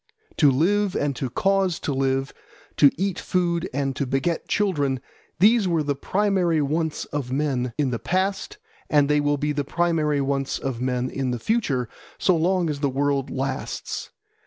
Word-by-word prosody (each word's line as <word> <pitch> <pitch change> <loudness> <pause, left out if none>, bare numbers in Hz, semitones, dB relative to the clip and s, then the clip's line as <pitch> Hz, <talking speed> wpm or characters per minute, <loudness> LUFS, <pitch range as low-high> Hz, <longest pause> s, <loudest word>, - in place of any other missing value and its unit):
To 150 - +6
live 190 +8 +2
and 145 -2 0
to 130 - -2
cause 190 +3 +1
to 145 - -2
live, 135 0 0 0.4
to 145 - +7
eat 195 +1 -1
food 175 -1 0
and 135 0 -1
to 140 - -1
beget 135 +6 -1
children, 145 -10 0 0.4
these 210 +3 +5
were 165 -3 +1
the 145 -1 0
primary 185 0 +1
wants 155 +2 -1
of 140 -4 -4
men 130 -3 -1
in 140 -4 +1
the 115 - -2
past, 195 - -1 0.3
and 145 -2 +4
they 150 0 +3
will 145 0 +1
be 150 +2 -1
the 145 -1 -1
primary 155 -1 +1
wants 135 0 -1
of 130 -3 -4
men 125 0 -1
in 135 -2 -2
the 125 - -1
future 135 - 0 0.3
so 185 - +3
long 175 +2 +1
as 150 -2 -2
the 140 -1 +1
world 140 0 0
lasts. 135 +1 -4
145 Hz, 175 wpm, -24 LUFS, 135-175 Hz, 0.4 s, to